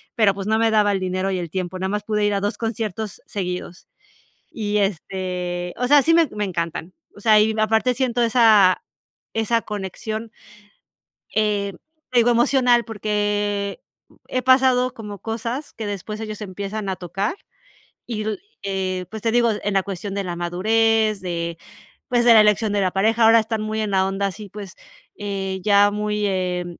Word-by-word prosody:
pero, 215 -5 +4
pues, 195 0 -6
no 220 +1 +2
me 225 0 +3
daba 210 -1 +3
el 195 - 0
dinero 185 +1 -1
y 185 - -1
el 170 -2 -5
tiempo, 185 +1 -4
nada 190 +1 -2
más 205 +1 -2
pude 210 0 -1
ir 205 - +1
a 200 - +1
2 205 +2 -2
conciertos 220 -2 -4
seguidos. 180 -2 -5 0.6
Y 210 -2 -1
este 180 -2 -3
o 250 - 0
sea, 290 +1 +6
sí 330 +4 +3
me 330 -2 +4
me 210 0 -2
encantan. 170 -1 -4 0.2
O - - -12
sea, 215 0 +5
y 220 +1 +2
aparte 220 +3 +2
siento 245 -2 0
esa 220 -5 +5 0.5
esa 225 +1 +1
conexión, 215 +2 -5 1.0
eh, 205 -2 +1 0.4
te 250 - +2
digo, 240 +1 +5
emocional, 240 0 +3
porque 205 -2 -1 0.5
he 255 0 -1
pasado 255 -1 +4
como 210 -3 -8
cosas 230 +6 -4
que 220 - -5
después 205 +2 -5
ellos 215 -1 -6
empiezan 200 +1 -5
a 190 - -2
tocar, 195 - -3 0.7
y 215 -3 -4
l 215 -1 -2 0.3
eh, 185 -2 -2
pues, 220 - -6
te 225 - +1
digo, 235 -1 +3
en 205 - -1
la 195 - +3
cuestión 195 0 -5
de 200 - -1
la 175 -1 -4
madurez, 215 +4 +1
de, 170 -2 -3 0.5
pues, 240 -1 +2
de 235 - +8
la 220 - +8
elección 210 0 +2
de 200 - +1
la 185 - +1
pareja, 220 +5 +2
ahora 225 +1 +7
están 220 0 -2
muy 215 0 -3
en 210 - -2
la 190 -1 +2
onda 195 +1 -1
así, 205 +1 -8
pues, 200 -2 -9 0.4
eh, 195 -2 -3
ya 205 -1 +5
muy, 210 0 -1
eh, 180 -2 -1
210 Hz, 180 wpm, -22 LUFS, 190-225 Hz, 1.0 s, de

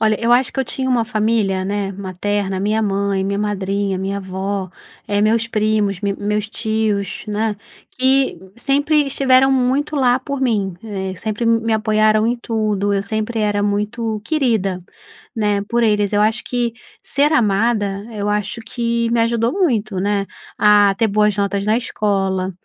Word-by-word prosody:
Olha, 215 -1 +3
eu 235 +1 +2
acho 250 +1 +3
que - - -6
eu - - 0
tinha 260 +2 -2
uma 240 -3 +2
família, 215 -3 0
né, 200 0 -2
materna, 195 +1 -3
minha 215 +3 0
mãe, 200 -1 0
minha 200 +1 -1
madrinha, 200 -1 -1
minha 195 +1 -2
avó, 190 0 -4 0.4
eh, 205 0 0
meus 225 +2 +2
primos, 215 -3 0
meus 205 +1 -2
tios, 220 -4 -2
né. 210 0 -1 0.4
Que 265 -4 +2 0.2
sempre 285 +3 +2
estiveram 270 0 +3
muito 265 +4 +1
lá 255 -2 +3
por 280 +1 -5
mim, 205 -8 0
eh, 190 -3 -4
sempre 215 +4 -3
me 230 0 +2
apoiaram 215 0 +2
em 240 +1 +1
tudo, 215 -3 -1
eu 195 - 0
sempre 215 +3 -3
era 205 -1 +1
muito 210 +2 -1
querida, 230 - 0 0.6
né, 205 -2 +1
por 235 0 +1
eles. 210 -2 +2
Eu 205 - +2
acho 220 +2 +1
que 240 -2 -1 0.3
ser 290 +2 +2
amada, 205 -4 +1
eu 205 -1 -3
acho 210 +2 -2
que 235 0 -1
me 235 -1 +2
ajudou 230 +1 +1
muito, 225 - 0
né, 200 0 0 0.3
a 205 -1 +5
ter 225 - +3
boas 210 0 +2
notas 200 0 -1
na 215 - +3
escola, 195 -5 -1
215 Hz, 160 wpm, -19 LUFS, 200-235 Hz, 0.6 s, a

